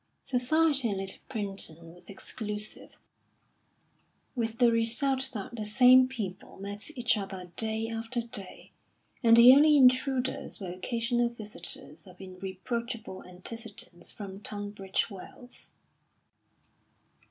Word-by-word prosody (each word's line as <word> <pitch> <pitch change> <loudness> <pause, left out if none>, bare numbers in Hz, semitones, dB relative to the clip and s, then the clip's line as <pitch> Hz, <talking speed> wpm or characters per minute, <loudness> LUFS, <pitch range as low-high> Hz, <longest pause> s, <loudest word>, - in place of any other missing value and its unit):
Society 275 +1 +2
in 200 - -2
Little 195 0 -5
Primpton 180 -6 -5
was 175 0 -11
exclusive, 210 +1 -7 1.4
with 230 -3 -2
the 240 -2 +5
result 260 +4 +1
that 205 +2 -5
the 220 - -4
same 250 +4 +6
people 205 -7 -6
met 200 +4 -4
each 245 -1 +2
other 190 -3 -7
day 220 0 -1
after 230 +2 -3
day, 210 -5 -6 0.5
and 230 -2 +6
the 240 +2 +10
only 300 +2 +6
intruders 260 0 +2
were 185 -3 -5
occasional 235 +5 0
visitors 185 -8 -6
of 180 -1 -15
irreproachable 195 +4 -5
antecedents 185 -1 -10
from 195 -2 -8
Tunbridge 205 -1 -3
Wells. 245 +6 -11
225 Hz, 110 wpm, -29 LUFS, 195-245 Hz, 1.4 s, the